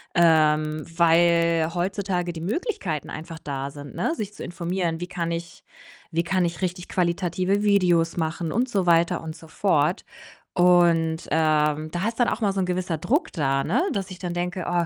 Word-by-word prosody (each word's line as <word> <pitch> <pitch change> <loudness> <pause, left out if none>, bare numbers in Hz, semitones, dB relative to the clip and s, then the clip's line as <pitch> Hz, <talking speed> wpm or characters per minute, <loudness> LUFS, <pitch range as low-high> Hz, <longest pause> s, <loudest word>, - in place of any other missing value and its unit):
ähm, 155 -2 +3
weil 170 -1 +4
heutzutage 180 0 -1
die 165 -1 -8
Möglichkeiten 195 - -3
einfach 160 +1 -7
da 140 -1 -4
sind, 145 -1 -10
ne, 320 - 0
sich 210 -7 -5
zu - - -8
informieren: 170 -1 -2
„Wie 175 - -3
kann 175 -2 -3
ich 170 0 -6 0.5
wie 165 0 +1
kann 185 +1 +1
ich 170 +1 -4
richtig 180 -1 -3
qualitative 180 +2 0
Videos 180 -5 +3
machen?“, 160 0 -2
und 245 +7 0
so 195 -6 0
weiter 170 -1 +3
und 160 0 -6
so 165 - -14
fort. 160 -1 +1 0.5
Und, 170 -2 +3
ähm, 155 -1 +2
da 175 +5 -1
ist 230 +1 -4
dann 245 - +4
auch - - -3
immer 200 -3 +1
so 195 - -2
‘n 185 - +1
gewisser 180 -2 -1
Druck 290 - 0
da, 135 -3 0
ne, - - +1
dass 195 -2 -3
ich 185 - -9
dann 175 -2 -4
denke: 180 +1 -3
„Oh, 175 -1 +1
170 Hz, 185 wpm, -24 LUFS, 160-185 Hz, 0.5 s, weil